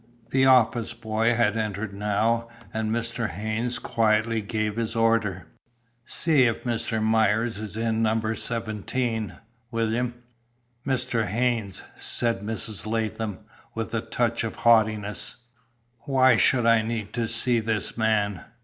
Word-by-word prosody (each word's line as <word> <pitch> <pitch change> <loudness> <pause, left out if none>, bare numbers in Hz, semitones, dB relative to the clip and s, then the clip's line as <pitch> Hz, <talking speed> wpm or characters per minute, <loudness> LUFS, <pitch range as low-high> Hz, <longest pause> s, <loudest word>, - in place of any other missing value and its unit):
The 130 0 +4
office 120 -2 +3
boy 115 +1 0
had 110 -2 +2
entered 105 -1 -3
now, 110 +3 0 0.2
and 110 0 -1
Mr. 115 0 -1
Haynes 110 +6 -2
quietly 110 0 +1
gave 105 0 -2
his 115 0 -2
order. 115 -6 +1 0.6
"See 155 -6 +4
if 115 -2 0
Mr. 115 -2 -1
Myers 110 0 +2
is 110 -1 -6
in 115 0 0
number 110 0 +1
seventeen, 115 0 -3 0.3
William." 115 +1 -1 0.7
"Mr. 120 -4 0
Haynes," 115 -2 -1
said 115 -4 0
Mrs. 110 0 -3
Latham, 110 -2 -3 0.3
with 115 0 -4
a 115 - 0
touch 120 -1 -1
of 115 - -4
haughtiness, 110 -3 +2 0.7
"Why 130 -2 +5
should 120 +2 +3
I 115 -1 +5
need 110 -2 -4
to 115 -1 -1
see 115 +1 +1
this 110 -2 -1
man? 105 -5 +1
115 Hz, 130 wpm, -25 LUFS, 110-115 Hz, 0.7 s, Why